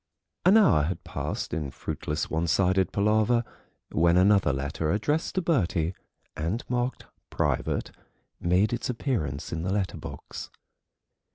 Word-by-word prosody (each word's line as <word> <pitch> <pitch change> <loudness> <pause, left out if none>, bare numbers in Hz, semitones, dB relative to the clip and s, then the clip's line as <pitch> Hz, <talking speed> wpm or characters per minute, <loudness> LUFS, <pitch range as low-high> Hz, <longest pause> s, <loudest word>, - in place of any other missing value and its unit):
An 200 +4 +8
hour 180 - +5
had 90 +3 -3
passed - - -4
in 75 -4 -2
fruitless 75 +2 -3
one 80 +2 -1
sided 95 +2 +2
palaver 110 +3 +3 0.5
when 85 +2 +4
another 95 -4 +5
letter 70 +3 -2
addressed 145 - 0
to 185 - +1
Bertie 90 - +1 0.4
and 85 +10 -2
marked 125 +1 -2 0.2
"private" - - -1 0.5
made 90 +6 +2
its 120 - -2
appearance 95 - -2
in 80 - -2
the 90 +3 -2
letter 100 -2 -1
box. - - -8
95 Hz, 130 wpm, -27 LUFS, 80-120 Hz, 0.5 s, An